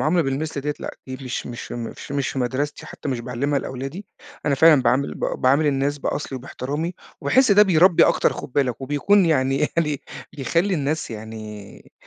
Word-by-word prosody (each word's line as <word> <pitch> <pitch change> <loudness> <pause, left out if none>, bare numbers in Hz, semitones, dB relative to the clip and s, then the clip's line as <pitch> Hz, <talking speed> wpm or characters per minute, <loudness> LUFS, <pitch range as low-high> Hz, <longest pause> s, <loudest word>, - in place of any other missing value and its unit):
المعاملة 170 +3 +2
بالمثل 140 +1 -2
ديّة 150 +1 -2
لأ - - -5
دي 130 - -5
مش 125 - -4
مش 120 -1 -7
مش 120 +3 -6
مش 140 -1 0
في 135 - -4
مدرستي 130 +4 -2
حتى - - -7
مش 125 -3 -1
باعلّمها 135 +4 -1
لأولادي، 135 +10 -6 0.4
أنا 140 - +3
فعلًا 150 -1 +6
باعامِل 135 +3 +1
ب - - -10
باعامِل 140 +4 +2
الناس 140 +1 0
بأصلي، 140 -1 -3
وباحترامي، 145 +6 -4 0.3
وباحس 235 - +4
ده 205 - +7
بيرَبّي 180 -2 +5
أكتر - - +3
خُد 125 - -8
بالك 130 -4 0
وبيكون 145 +9 +3
يعني 135 -4 +2 0.2
يعني 150 -4 0 0.3
بيخَلّي 170 +7 0
الناس 150 -2 -2
يعني 110 -2 -9
140 Hz, 175 wpm, -22 LUFS, 130-155 Hz, 0.4 s, ده